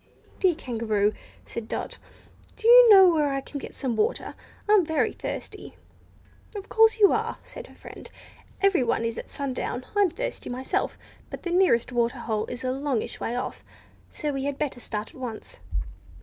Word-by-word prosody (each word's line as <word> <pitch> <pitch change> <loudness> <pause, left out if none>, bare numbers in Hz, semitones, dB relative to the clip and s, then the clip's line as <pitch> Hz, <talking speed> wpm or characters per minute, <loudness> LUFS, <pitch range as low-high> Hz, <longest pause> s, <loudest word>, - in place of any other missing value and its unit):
"Dear 365 -4 +3
Kangaroo," 220 -7 0 0.3
said 230 -1 -6
Dot, - - -4 0.6
"do 445 - -2
you 485 0 +9
know 385 -3 +9
where 300 -3 +2
I 275 - -1
can 280 +1 -7
get - - -9
some 255 -4 -2
water? 215 - -1 0.3
I'm 415 -3 +5
very 320 -1 0
thirsty!" - - -6 0.8
"Of 405 0 -7
course 445 0 +5
you 410 -2 +6
are," - - -1
said - - -10
her - - -17
friend; - - -11 0.5
"everyone 340 -13 +2
is 230 0 -3
at - - -9
sundown. 260 -2 -4
I'm 405 -2 +4
thirsty - - -5
myself. 255 +2 -2 0.3
But - - -8
the 350 - -3
nearest 350 -11 +3
water 240 +1 0
hole 220 -3 -2
is 245 +1 -7
a 255 - 0
longish 270 -3 -2
way 235 - -3
off, 250 - -4 0.5
so 300 -2 -3
we 270 0 -3
had 285 -1 -2
better 280 -4 -3
start 215 -2 -4
at 260 - -14
once." 225 - -7
275 Hz, 175 wpm, -26 LUFS, 235-375 Hz, 0.8 s, you